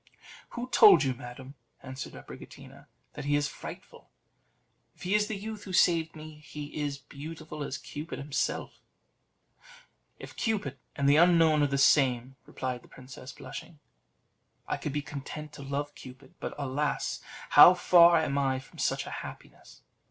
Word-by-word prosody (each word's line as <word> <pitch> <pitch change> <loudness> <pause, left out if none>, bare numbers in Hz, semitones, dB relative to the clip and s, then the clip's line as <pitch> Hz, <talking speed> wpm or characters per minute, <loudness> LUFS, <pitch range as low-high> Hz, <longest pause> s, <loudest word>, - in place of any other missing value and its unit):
"Who 240 +1 -3
told 410 - +8
you, 135 -1 0
madam," 125 +2 -10 0.3
answered 130 -1 -7
Abricotina, - - -12 0.3
"that - - -7
he 145 0 +2
is 145 0 +1
frightful? - - -10 0.9
If - - -14
he 185 +2 -1
is 210 0 +3
the 215 - -4
youth 215 +1 -7
who 190 - -7
saved 165 -3 +3
me, 155 0 -10
he 150 -1 -9
is 145 -2 -2
beautiful 150 +2 -8
as 140 - -4
Cupid 150 +3 -7
himself." 140 +1 -3 1.4
"If - - -11
Cupid 195 - -2 0.2
and 140 - 0
the 145 +1 +6
unknown 165 -3 +5
are 145 - +4
the 140 0 -1
same," 135 -2 +3
replied 125 -2 -4
the - - -19
princess, 130 0 -11
blushing, 160 - -10 0.9
"I - - -1
could 150 - -4
be 145 +1 -2
content 150 +1 -7
to - - -10
love 140 +1 -4
Cupid; 130 +1 -13
but - - -5
alas! 145 +1 -2 0.3
how 180 - +10
far 170 -1 +6
am 140 -3 0
I 135 -1 +1
from 130 - -12
such - - 0
a - - -8
happiness! - - -12
145 Hz, 160 wpm, -29 LUFS, 135-165 Hz, 1.4 s, how